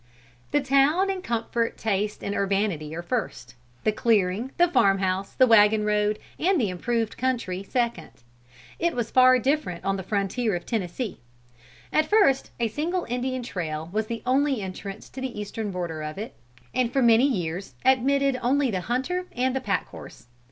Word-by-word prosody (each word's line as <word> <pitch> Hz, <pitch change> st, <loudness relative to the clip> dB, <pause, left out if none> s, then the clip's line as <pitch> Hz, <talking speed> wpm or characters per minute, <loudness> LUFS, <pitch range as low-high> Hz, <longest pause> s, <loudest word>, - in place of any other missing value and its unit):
"The 290 Hz, -, +2 dB
town 280 Hz, +8 st, +3 dB
and 375 Hz, -1 st, -5 dB
comfort, 230 Hz, -2 st, -1 dB
taste 210 Hz, -1 st, -1 dB
and 200 Hz, -, -2 dB
urbanity 195 Hz, -6 st, -1 dB
are 170 Hz, -, -5 dB
first; 175 Hz, -, -3 dB, 0.3 s
the 215 Hz, -, +3 dB
clearing, 215 Hz, +1 st, +1 dB
the 350 Hz, -, +5 dB
farm 195 Hz, -, +3 dB
house, 190 Hz, 0 st, -1 dB
the 260 Hz, -, +5 dB
wagon 215 Hz, -2 st, +5 dB
road 210 Hz, 0 st, +1 dB, 0.2 s
and 365 Hz, +1 st, +2 dB
the 220 Hz, -6 st, +1 dB
improved 225 Hz, +4 st, -2 dB
country, 235 Hz, -8 st, -1 dB
second. 235 Hz, -4 st, -2 dB, 0.7 s
It 340 Hz, 0 st, 0 dB
was 235 Hz, -2 st, -2 dB
far 255 Hz, 0 st, +6 dB
different 260 Hz, -, -1 dB
on 195 Hz, 0 st, +1 dB
the -, -, -4 dB
frontier 200 Hz, +3 st, -1 dB
of 175 Hz, -, -5 dB
Tennessee. 215 Hz, +1 st, -3 dB, 0.7 s
At 310 Hz, 0 st, +3 dB
first 395 Hz, -11 st, +3 dB
a 235 Hz, -, +2 dB
single 335 Hz, -, -2 dB
Indian 250 Hz, +1 st, -2 dB
trail 160 Hz, -7 st, -4 dB
was 215 Hz, 0 st, -1 dB
the 230 Hz, -1 st, -5 dB
only 270 Hz, 0 st, +2 dB
entrance 195 Hz, +2 st, -7 dB
to 265 Hz, -, -8 dB
the 260 Hz, -5 st, -4 dB
Eastern 210 Hz, +1 st, -4 dB
border 175 Hz, -4 st, -4 dB
of 155 Hz, +2 st, -6 dB
it, 215 Hz, +3 st, -6 dB, 0.4 s
and 250 Hz, -2 st, +1 dB
for 270 Hz, 0 st, +2 dB
many 235 Hz, +3 st, +6 dB
years 180 Hz, -, -3 dB
admitted 265 Hz, +1 st, +3 dB
only 265 Hz, +1 st, +2 dB
the 185 Hz, -3 st, -2 dB
hunter 300 Hz, -, -2 dB
and 255 Hz, +1 st, 0 dB
the 265 Hz, -, -1 dB
pack 200 Hz, -6 st, -1 dB
horse. 115 Hz, -, -12 dB
230 Hz, 175 wpm, -25 LUFS, 195-260 Hz, 0.7 s, far